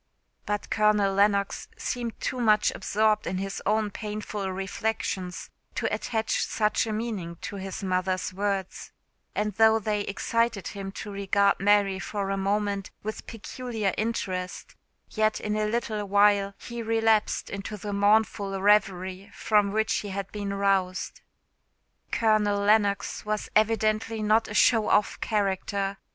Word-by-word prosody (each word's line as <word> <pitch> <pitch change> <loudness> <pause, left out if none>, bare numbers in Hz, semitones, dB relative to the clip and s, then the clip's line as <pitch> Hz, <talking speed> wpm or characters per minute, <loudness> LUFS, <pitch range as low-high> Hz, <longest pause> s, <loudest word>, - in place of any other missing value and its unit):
But 205 0 -3
Colonel 210 -2 +3
Lennox 200 0 +1
seemed 235 -2 -4
too 255 - -3
much 215 -3 +4
absorbed 215 0 +1
in 185 - -1
his 195 +1 -4
own 215 0 +1
painful 210 -2 -4
reflections 190 -1 -3 0.2
to - - -1
attach 220 -2 -1
such 215 +1 0
a - - -2
meaning 210 -6 -3
to 200 - -5
his 195 0 -6
mother's 185 0 -1
words; 195 -1 -3 0.4
and 210 0 -1
though 220 0 +6
they 210 -1 -1
excited 230 +1 -1
him 195 -1 -6
to 205 - -7
regard 200 0 +2
Mary 200 -1 +3
for 200 -1 -3
a - - +1
moment 200 0 -1
with 215 +1 -5
peculiar 225 -2 -3
interest, 185 -5 -3 0.4
yet, 215 0 +1
in 210 0 -2
a 215 0 0
little 215 -2 -2
while, 200 0 +3
he 235 -1 -7
relapsed 225 -1 +1
into 200 +2 -5
the 205 +1 -5
mournful 205 -1 +2
reverie 195 -1 +2
from 210 -2 +2
which 220 +1 +1
he 205 - -4
had 195 0 -4
been 205 -1 -4
roused. 195 -2 0 0.9
Colonel 215 -2 +2
Lennox 200 -1 +2
was 215 0 -2
evidently 215 0 +2
not 215 +2 +3
a 210 - -6
show 225 -2 +4
off 210 - +2
character. 200 -1 -1
205 Hz, 140 wpm, -27 LUFS, 195-215 Hz, 0.9 s, though